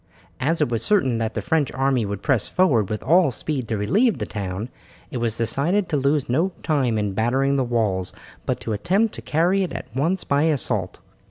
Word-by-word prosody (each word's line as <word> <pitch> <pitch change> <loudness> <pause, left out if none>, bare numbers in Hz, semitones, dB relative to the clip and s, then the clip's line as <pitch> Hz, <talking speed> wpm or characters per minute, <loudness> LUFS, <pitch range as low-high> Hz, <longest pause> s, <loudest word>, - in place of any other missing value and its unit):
As 160 +5 0
it 150 - +2
was 115 -2 -1
certain 135 - +2
that 110 -1 -2
the - - -2
French 155 -4 +1
army 135 -4 +1
would 100 0 -5
press 130 -7 +2
forward 130 - +2
with 105 - -3
all 170 +5 +4
speed 130 +1 -3
to 110 - -1
relieve 205 - +2
the - - -3
town, 100 +2 -5 0.4
it - - -3
was 115 -2 -1
decided 165 - +1
to - - 0
lose 140 0 +1
no 165 +10 +1
time 135 -8 +1
in 105 -2 -1
battering 130 +6 +1
the 135 - +2
walls, 110 -7 0 0.4
but - - 0
to 110 - -3
attempt 195 - +1
to - - -7
carry 175 +5 +1
it 185 - -2
at 130 -1 -8
once 170 +7 0
by 140 0 +1
assault. 150 -6 -1
135 Hz, 205 wpm, -23 LUFS, 115-160 Hz, 0.4 s, all